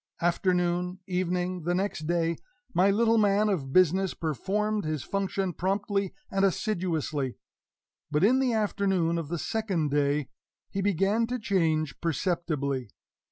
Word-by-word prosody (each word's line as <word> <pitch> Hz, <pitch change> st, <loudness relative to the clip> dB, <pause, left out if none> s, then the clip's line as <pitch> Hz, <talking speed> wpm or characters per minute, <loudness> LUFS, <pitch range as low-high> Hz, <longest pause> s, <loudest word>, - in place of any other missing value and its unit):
Afternoon 180 Hz, +1 st, +1 dB
evening 180 Hz, 0 st, -1 dB
the 175 Hz, +2 st, 0 dB
next 185 Hz, -5 st, -2 dB
day 170 Hz, -1 st, +1 dB, 0.4 s
my 185 Hz, +3 st, +4 dB
little 225 Hz, +2 st, +3 dB
man 205 Hz, 0 st, +3 dB
of 145 Hz, -9 st, -1 dB
business 185 Hz, +3 st, +3 dB
performed 205 Hz, -, -1 dB
his 155 Hz, -2 st, -2 dB
function 195 Hz, -2 st, -1 dB
promptly 195 Hz, +1 st, -1 dB, 0.2 s
and 195 Hz, 0 st, +1 dB
assiduously. 170 Hz, -, -1 dB, 0.7 s
But 150 Hz, +2 st, +1 dB
in 250 Hz, +6 st, +5 dB
the 260 Hz, -2 st, +2 dB
afternoon 195 Hz, -6 st, +1 dB
of 165 Hz, -, -5 dB
the 170 Hz, +3 st, -3 dB
second 185 Hz, -6 st, -1 dB
day 145 Hz, 0 st, +1 dB, 0.4 s
he 195 Hz, -, -2 dB
began 200 Hz, +4 st, +2 dB
to 250 Hz, +1 st, -2 dB
change 160 Hz, -, 0 dB
perceptibly. 155 Hz, -, -1 dB
180 Hz, 130 wpm, -28 LUFS, 165-200 Hz, 0.7 s, in